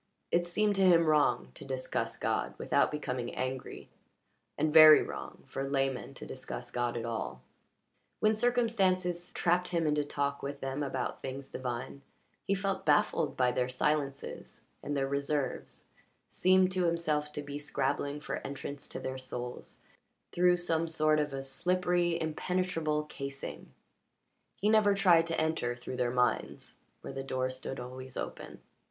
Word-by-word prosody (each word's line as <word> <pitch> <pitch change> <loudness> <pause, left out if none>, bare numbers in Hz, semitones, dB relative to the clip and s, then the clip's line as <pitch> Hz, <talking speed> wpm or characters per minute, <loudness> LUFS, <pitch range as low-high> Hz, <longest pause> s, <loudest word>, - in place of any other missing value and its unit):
It 175 0 +2
seemed 210 +4 +2
to - - +2
him 175 -3 +6
wrong 145 - +2
to - - -10
discuss 130 -1 -3
God - - -1
without - - +2
becoming 125 -5 -4
angry, 130 0 -5 0.7
and 155 0 +1
very 155 -1 +10
wrong - - -7
for 135 0 -4
laymen 135 -1 -1
to - - -8
discuss 125 -2 -7
God 120 -1 -1
at 115 - -3
all. 110 - -4 0.8
When 215 0 +4
circumstances 195 -7 +1
trapped 180 +1 +1
him 170 -2 0
into 150 -1 +2
talk 140 -1 -2
with 140 0 -5
them 135 +1 -3
about 135 -3 -3
things 135 +1 -6
divine, 125 +2 -5 0.5
he 195 - +2
felt 195 0 -2
baffled 145 -1 +2
by 125 -1 +3
their 125 0 0
silences 140 +1 -2 0.2
and 145 0 -3
their 135 0 +1
reserves, 140 0 -2 0.4
seemed 185 0 +3
to 185 -1 +1
himself 155 -3 0
to 150 - -4
be 145 0 -6
scrabbling 145 0 -1
for - - -3
entrance 140 0 -6
to - - -6
their 130 0 -4
souls 125 -1 -7 0.5
through 180 0 +4
some 165 -2 0
sort 155 -1 +3
of 150 -1 0
a 135 0 -4
slippery, 175 +4 +1
impenetrable 165 -1 -1
casing; 140 -2 -7 0.8
he 205 - -1
never 215 -2 +5
tried 175 -4 +5
to 165 - -1
enter 155 -7 0
through 125 +1 -7
their 125 - +1
minds, 125 0 -1 0.2
where - - -7
the 135 - -4
door 130 -1 -2
stood 130 +1 -6
always 130 +1 -8
open. - - -6
150 Hz, 155 wpm, -31 LUFS, 130-175 Hz, 0.8 s, very